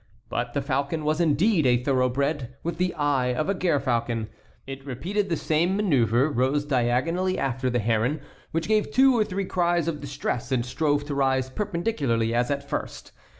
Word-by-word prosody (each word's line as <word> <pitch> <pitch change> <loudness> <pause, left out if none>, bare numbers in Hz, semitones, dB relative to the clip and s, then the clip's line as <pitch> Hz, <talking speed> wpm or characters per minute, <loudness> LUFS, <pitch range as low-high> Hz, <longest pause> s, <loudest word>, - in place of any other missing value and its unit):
But 120 0 -3
the 140 - 0
falcon 140 +3 -1
was 155 +2 +1
indeed 165 - +3
a 120 -1 +4
thoroughbred, 130 0 0
with 170 0 -3
the 180 0 +1
eye 135 -5 +1
of 155 +8 -1
a - - +3
gerfalcon. 120 - 0 0.4
It 135 0 -8
repeated 185 - -2
the 165 - 0
same 170 +6 +1
manœuvre, 135 - +2
rose 135 +4 +1
diagonally 145 +8 +1
after 130 -1 -1
the 120 - 0
heron, 115 +6 +1 0.3
which 165 +1 -2
gave 215 -1 +2
two 265 0 +5
or 220 - +3
three 195 -1 -3
cries 175 -3 +1
of 150 -3 -2
distress 140 -3 -3
and 120 -2 +1
strove 145 +2 0
to 145 - -4
rise 130 -1 +1
perpendicularly 150 - -1
as 120 +1 +1
at 140 0 -2
first. - - -5
140 Hz, 175 wpm, -25 LUFS, 125-170 Hz, 0.4 s, two